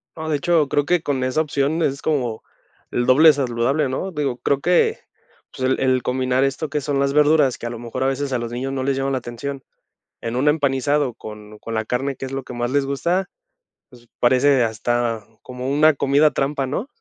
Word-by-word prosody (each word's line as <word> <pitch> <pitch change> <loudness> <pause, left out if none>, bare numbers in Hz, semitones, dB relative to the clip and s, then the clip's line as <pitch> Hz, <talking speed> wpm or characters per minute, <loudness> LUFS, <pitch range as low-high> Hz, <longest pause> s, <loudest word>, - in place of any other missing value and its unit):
No, 160 -1 -5
de 150 - +1
hecho, 155 -1 +2
creo 145 0 +1
que 175 +1 +1
con 135 -3 -1
esa 130 +4 +1
opción 150 +1 -1
es 140 -1 -1
como, 125 -8 -1 0.5
el 120 - 0
doble 150 +5 +7
saludable, 135 +2 0
¿no? 185 +9 -3
Digo, 140 -6 -2
creo 140 +1 0
que, 175 +1 +2 0.5
pues, 130 0 -2
el 130 - +1
el 130 -2 +2
combinar 130 +1 +1
esto 135 +3 -2
que 150 - -1
son 140 -1 -1
las 140 0 +1
verduras, 150 -3 +4
que - - -8
a - - -2
lo 120 -1 -7
mejor 120 +2 -4
a - - +2
veces 135 +1 -2
a 125 - +1
los 120 0 -5
niños 130 +2 -3
no 135 -1 -2
les 135 0 0
llama 135 +1 -1
la 130 - 0
atención, 130 +3 -6 0.6
en 115 +1 -4
un 130 - +1
empanizado 145 -2 +1
con 105 -1 -11
con 115 +1 -7
la 110 - -1
carne, 135 +5 -2
que 135 - -6
es 130 - -8
lo 135 -1 -4
que - - -9
más 120 0 -2
les 140 0 +1
gusta, 170 +8 -1 0.6
pues, 120 -2 -18
parece 130 +1 +4
hasta 115 0 -1 0.2
como 125 0 -7
una 155 +3 +4
comida 140 +3 +3
trampa, 135 0 -1
¿no? 170 - -3
135 Hz, 220 wpm, -21 LUFS, 125-145 Hz, 0.6 s, doble